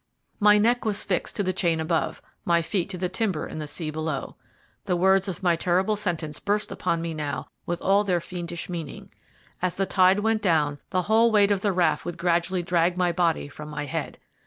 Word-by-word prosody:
My 210 Hz, 0 st, +6 dB
neck 235 Hz, +4 st, +2 dB
was 210 Hz, -2 st, +1 dB
fixed 185 Hz, -3 st, -2 dB
to 205 Hz, -, 0 dB
the 185 Hz, -1 st, 0 dB
chain 170 Hz, -3 st, +1 dB
above, 160 Hz, 0 st, -1 dB, 0.2 s
my 170 Hz, -1 st, +2 dB
feet 180 Hz, +2 st, -2 dB
to 185 Hz, -, -5 dB
the 180 Hz, +1 st, -1 dB
timber 190 Hz, -5 st, -1 dB
in -, -, -7 dB
the 150 Hz, -, -4 dB
sea 155 Hz, +1 st, -3 dB
below. 155 Hz, -2 st, -4 dB, 0.5 s
The 185 Hz, -3 st, +1 dB
words 190 Hz, +2 st, +3 dB
of 190 Hz, -1 st, -5 dB
my 175 Hz, -2 st, +4 dB
terrible 185 Hz, +5 st, +1 dB
sentence 165 Hz, -7 st, -3 dB
burst 210 Hz, +1 st, -1 dB
upon 165 Hz, 0 st, -1 dB
me 165 Hz, -1 st, -3 dB
now 150 Hz, -2 st, -4 dB, 0.2 s
with 175 Hz, 0 st, -3 dB
all 200 Hz, +2 st, +4 dB
their 180 Hz, -4 st, +1 dB
fiendish 175 Hz, -1 st, -6 dB
meaning. 165 Hz, -5 st, -7 dB, 0.5 s
As 180 Hz, -1 st, 0 dB
the 195 Hz, -, 0 dB
tide 190 Hz, +1 st, +4 dB
went 220 Hz, 0 st, +1 dB
down 150 Hz, -6 st, +1 dB
the 185 Hz, 0 st, 0 dB
whole 225 Hz, +4 st, +4 dB
weight 205 Hz, -1 st, +4 dB
of 200 Hz, -2 st, +1 dB
the 205 Hz, -, +1 dB
raft 175 Hz, -4 st, +1 dB
would 175 Hz, 0 st, -5 dB
gradually 175 Hz, +1 st, 0 dB
drag 175 Hz, 0 st, +1 dB
my 180 Hz, -1 st, +2 dB
body 170 Hz, -4 st, 0 dB
from 150 Hz, +1 st, -10 dB
my 150 Hz, 0 st, -4 dB
head. 135 Hz, -, -4 dB
180 Hz, 210 wpm, -25 LUFS, 165-195 Hz, 0.5 s, My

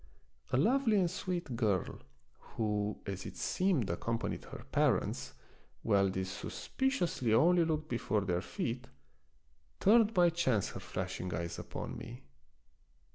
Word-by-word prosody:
A -, -, +3 dB
lovely 245 Hz, -3 st, +3 dB
and 180 Hz, -3 st, +2 dB
sweet 180 Hz, -7 st, -3 dB
girl, 105 Hz, -6 st, 0 dB, 0.6 s
who, 105 Hz, -2 st, 0 dB
as 95 Hz, -2 st, -4 dB
it -, -, -9 dB
seemed, 180 Hz, -, +1 dB
accompanied 115 Hz, +6 st, -2 dB
her -, -, -9 dB
parents, -, -, +1 dB, 0.5 s
while 100 Hz, -3 st, +3 dB
these 95 Hz, 0 st, -3 dB
suspiciously 175 Hz, -, -1 dB
only 175 Hz, +6 st, +5 dB
looked 155 Hz, -1 st, -1 dB
before 115 Hz, -4 st, 0 dB
their 90 Hz, -2 st, 0 dB
feet, 125 Hz, +6 st, -4 dB, 0.9 s
turned 220 Hz, +1 st, +5 dB
by 175 Hz, -2 st, +5 dB
chance 130 Hz, -, +1 dB
her -, -, -7 dB
flashing 90 Hz, 0 st, -4 dB
eyes 85 Hz, +1 st, -4 dB
upon -, -, -6 dB
me. 120 Hz, +3 st, -9 dB
120 Hz, 130 wpm, -33 LUFS, -, 0.9 s, only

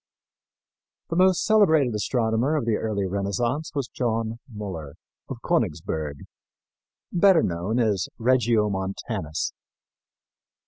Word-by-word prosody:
The -, -, 0 dB
most 185 Hz, 0 st, +4 dB
celebrated 160 Hz, -, +4 dB
astronomer 115 Hz, +5 st, 0 dB
of 145 Hz, -6 st, 0 dB
the 115 Hz, -2 st, +2 dB
early 105 Hz, -3 st, -1 dB
Renaissance 100 Hz, -, -1 dB
was 140 Hz, -4 st, -1 dB
John 115 Hz, -2 st, -2 dB
Müller, 95 Hz, -9 st, -6 dB, 0.4 s
of -, -, -6 dB
Königsburg, 75 Hz, -2 st, -1 dB, 0.9 s
better 180 Hz, -2 st, +5 dB
known 90 Hz, +7 st, -1 dB
as 105 Hz, -6 st, +1 dB
Regiomontanus. 105 Hz, -, 0 dB
110 Hz, 95 wpm, -25 LUFS, 95-130 Hz, 0.9 s, better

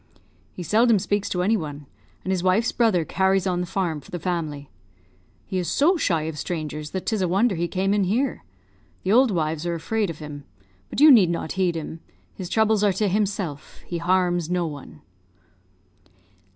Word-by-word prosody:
He 180 Hz, -, -7 dB
seldom 225 Hz, +6 st, +4 dB
speaks 200 Hz, +1 st, -1 dB
to 180 Hz, -1 st, -1 dB
any 215 Hz, +4 st, +3 dB
one, 150 Hz, -6 st, -5 dB, 0.4 s
and 190 Hz, -, -2 dB
his 185 Hz, -2 st, 0 dB
wife's 185 Hz, +6 st, +2 dB
brother 215 Hz, -9 st, +2 dB
carries 190 Hz, +1 st, +1 dB
on 180 Hz, -2 st, 0 dB
the 180 Hz, -, -3 dB
farm 170 Hz, -5 st, -2 dB
for -, -, -17 dB
the 175 Hz, -, -4 dB
family. 155 Hz, -5 st, -4 dB, 0.7 s
He 190 Hz, -2 st, -2 dB
is 175 Hz, -, -3 dB
so 330 Hz, +7 st, +3 dB
shy 170 Hz, -, 0 dB
of 155 Hz, -1 st, -5 dB
strangers 155 Hz, -3 st, -4 dB
that 190 Hz, +2 st, -5 dB
'tis 220 Hz, -3 st, 0 dB
a 185 Hz, -, +1 dB
wonder 195 Hz, +6 st, +2 dB
he 170 Hz, -1 st, -1 dB
came 195 Hz, +2 st, 0 dB
in 205 Hz, -2 st, +2 dB
here. 245 Hz, +8 st, -1 dB, 0.6 s
The 190 Hz, -, 0 dB
old 250 Hz, +3 st, +5 dB
wives 160 Hz, -4 st, -1 dB
are 170 Hz, -, -1 dB
afraid 210 Hz, +5 st, -1 dB
of 165 Hz, -, -6 dB
him; 150 Hz, -2 st, -8 dB, 0.5 s
but -, -, -4 dB
you 300 Hz, +1 st, +9 dB
need 205 Hz, -9 st, +6 dB
not 170 Hz, -2 st, -3 dB
heed 185 Hz, -3 st, 0 dB
him 160 Hz, 0 st, -6 dB, 0.3 s
his 185 Hz, -3 st, -7 dB
troubles 220 Hz, -1 st, +2 dB
are 205 Hz, -2 st, +3 dB
to 205 Hz, +3 st, 0 dB
himself, 195 Hz, -7 st, -3 dB
he 170 Hz, -, -4 dB
harms 175 Hz, -1 st, +1 dB
no 180 Hz, -1 st, 0 dB
one." 145 Hz, -4 st, -8 dB
185 Hz, 190 wpm, -24 LUFS, 165-205 Hz, 0.7 s, you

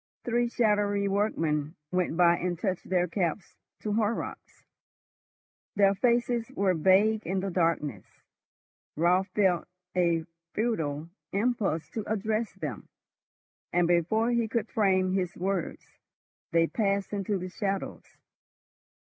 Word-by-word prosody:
Three 240 Hz, 0 st, +1 dB
shadowy 205 Hz, -3 st, +2 dB
workmen 165 Hz, -7 st, 0 dB, 0.2 s
went 180 Hz, -3 st, 0 dB
by 175 Hz, -1 st, +5 dB
and 175 Hz, -1 st, -2 dB
touched 185 Hz, 0 st, -3 dB
their 180 Hz, -1 st, +2 dB
caps 175 Hz, +1 st, -2 dB, 0.3 s
to 210 Hz, -, -2 dB
Horrocks. 220 Hz, +1 st, -2 dB, 1.1 s
Their 200 Hz, -1 st, +5 dB
faces 235 Hz, +2 st, +1 dB
were 190 Hz, -2 st, +2 dB
vague 195 Hz, +6 st, +4 dB
in 190 Hz, +2 st, 0 dB
the 195 Hz, 0 st, -3 dB
darkness. 160 Hz, -, 0 dB, 0.9 s
Raut 180 Hz, +4 st, +3 dB
felt 190 Hz, -4 st, +2 dB, 0.3 s
a 170 Hz, -3 st, +2 dB, 0.3 s
futile 165 Hz, -9 st, -1 dB, 0.2 s
impulse 200 Hz, -6 st, 0 dB
to 220 Hz, -, -3 dB
address 220 Hz, +1 st, -1 dB
them, 150 Hz, -, -6 dB, 0.8 s
and 175 Hz, 0 st, +3 dB
before 195 Hz, +7 st, +2 dB
he 235 Hz, -1 st, +1 dB
could 225 Hz, -1 st, -2 dB
frame 185 Hz, -3 st, +2 dB
his 185 Hz, -2 st, -1 dB
words, 190 Hz, -2 st, -3 dB, 0.5 s
they 165 Hz, 0 st, +4 dB
passed 200 Hz, +1 st, -1 dB
into 200 Hz, 0 st, -1 dB
the 185 Hz, 0 st, -5 dB
shadows. 195 Hz, +1 st, -4 dB
195 Hz, 120 wpm, -28 LUFS, 175-215 Hz, 1.1 s, by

